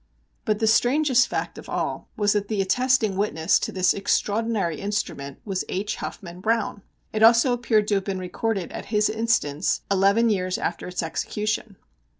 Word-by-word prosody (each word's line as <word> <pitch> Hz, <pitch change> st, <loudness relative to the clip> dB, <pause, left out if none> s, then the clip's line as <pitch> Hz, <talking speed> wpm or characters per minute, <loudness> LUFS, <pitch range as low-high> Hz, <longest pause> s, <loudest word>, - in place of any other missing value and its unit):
But 215 Hz, -1 st, +1 dB
the 220 Hz, -, 0 dB
strangest 250 Hz, +3 st, +3 dB
fact -, -, -4 dB
of -, -, -12 dB
all -, -, -3 dB
was 205 Hz, -1 st, +2 dB
that 205 Hz, -1 st, -1 dB
the 215 Hz, -1 st, -2 dB
attesting 235 Hz, +1 st, +2 dB
witness 170 Hz, -4 st, +2 dB
to -, -, -3 dB
this 185 Hz, -1 st, +2 dB
extraordinary 205 Hz, -4 st, 0 dB
instrument 200 Hz, -9 st, -3 dB
was 195 Hz, -3 st, -2 dB
H. 205 Hz, +3 st, -2 dB
Huffman 180 Hz, -1 st, -7 dB
Browne! 220 Hz, -1 st, 0 dB, 0.3 s
It 215 Hz, -, -1 dB
also 230 Hz, +3 st, +6 dB
appeared 230 Hz, -3 st, +1 dB
to -, -, +2 dB
have 195 Hz, -1 st, +1 dB
been 195 Hz, -2 st, -2 dB
recorded 185 Hz, +1 st, -3 dB
at -, -, -7 dB
his 210 Hz, -1 st, +1 dB
instance 220 Hz, -9 st, 0 dB
eleven 200 Hz, +4 st, +4 dB
years 185 Hz, -2 st, -1 dB
after 170 Hz, -, -3 dB
its 180 Hz, -1 st, -3 dB
execution. 210 Hz, +5 st, -3 dB
210 Hz, 165 wpm, -24 LUFS, 190-225 Hz, 0.3 s, also